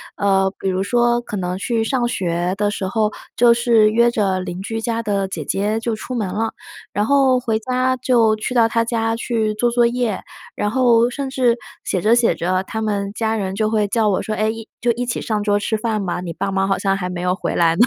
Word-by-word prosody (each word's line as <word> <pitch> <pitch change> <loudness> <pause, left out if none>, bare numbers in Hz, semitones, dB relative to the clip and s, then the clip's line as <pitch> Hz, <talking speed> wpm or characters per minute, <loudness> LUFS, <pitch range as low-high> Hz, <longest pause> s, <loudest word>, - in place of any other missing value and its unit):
呃， 195 -1 +2
比 195 - -1
如 185 0 0
说 240 +3 +2
可 220 - -7
能 180 -1 -2
去 225 +3 -1
上 240 +1 0
学 175 -4 -1
的 205 0 +1
时 205 - -3
候， 215 +1 0 0.2
就 235 0 +6
是 235 -2 +4
约 235 +2 +4
着 195 -5 0
邻 180 0 -5
居 225 +3 -4
家 230 0 -2
的 200 -2 0
姐 190 - -5
姐 210 +3 -1
就 235 - -1
出 245 +4 -5
门 220 - -1
了， 220 +4 -2 0.4
然 205 +1 +1
后 270 -1 +4
回 225 -3 -1
家 255 +2 0
就 235 -3 +3
去 230 +4 -3
到 235 -2 +5
她 230 0 +1
家 225 -1 0
去 225 -2 -1
做 240 +3 +1
作 240 0 +3
业， 235 -4 -1 0.3
然 205 - -1
后 240 -2 +4
甚 275 +1 -4
至 250 -3 +2 0.3
写 185 - -1
着 220 +5 +4
写 235 -1 +3
着 185 +2 -1
他 220 +3 -5
们 200 -2 -1
家 220 0 -1
人 195 -3 -2
就 215 0 0
会 215 -1 +1
叫 225 0 +2
我 195 -3 +1
说：” 215 - -3
哎， 215 - +1
一 225 0 -5
就 245 - 0
一 245 +2 -3
起 235 - -2
上 210 -2 -1
桌 205 -1 +2
吃 220 - -1
饭 215 -2 -1
吧， 175 0 -2
你 175 -2 -5
爸 195 - -3
妈 195 0 0
好 195 -1 +1
像 195 0 +1
还 180 -2 -3
没 180 - -5
有 180 0 +1
回 - - -3
来 165 -1 +3
呢。 230 - +5
220 Hz, 260 characters per minute, -20 LUFS, 195-235 Hz, 0.4 s, 就